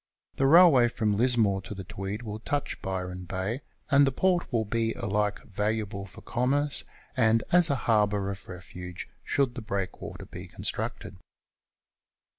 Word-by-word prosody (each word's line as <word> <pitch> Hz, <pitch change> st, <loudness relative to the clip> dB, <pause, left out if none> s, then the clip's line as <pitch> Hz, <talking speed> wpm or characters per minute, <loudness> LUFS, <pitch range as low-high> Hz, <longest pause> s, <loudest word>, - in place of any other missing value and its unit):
The 135 Hz, -, +3 dB
railway 155 Hz, -6 st, +7 dB
from 110 Hz, -3 st, 0 dB
Lismore 110 Hz, -4 st, +3 dB
to 105 Hz, -, -7 dB
the 95 Hz, -, -6 dB
Tweed 95 Hz, +4 st, -5 dB
will 105 Hz, -1 st, -5 dB
touch 145 Hz, +5 st, -3 dB
Byron 90 Hz, -1 st, -4 dB
Bay, 95 Hz, +9 st, -3 dB, 0.3 s
and 140 Hz, 0 st, +6 dB
the -, -, +2 dB
port 180 Hz, +4 st, +1 dB
will 115 Hz, -3 st, +1 dB
be 115 Hz, +1 st, 0 dB
alike 105 Hz, 0 st, -1 dB
valuable 105 Hz, -1 st, -2 dB
for -, -, -13 dB
commerce 140 Hz, +4 st, +1 dB, 0.3 s
and 115 Hz, 0 st, +3 dB
as 175 Hz, -1 st, +5 dB
a 140 Hz, -, +2 dB
harbour 105 Hz, -3 st, +2 dB
of 100 Hz, 0 st, -9 dB
refuge 90 Hz, 0 st, -8 dB, 0.2 s
should 135 Hz, -3 st, +1 dB
the 125 Hz, -, -6 dB
breakwater 100 Hz, -3 st, -4 dB
be -, -, -9 dB
confjtructed. 95 Hz, +1 st, -5 dB
110 Hz, 150 wpm, -28 LUFS, 95-125 Hz, 0.3 s, railway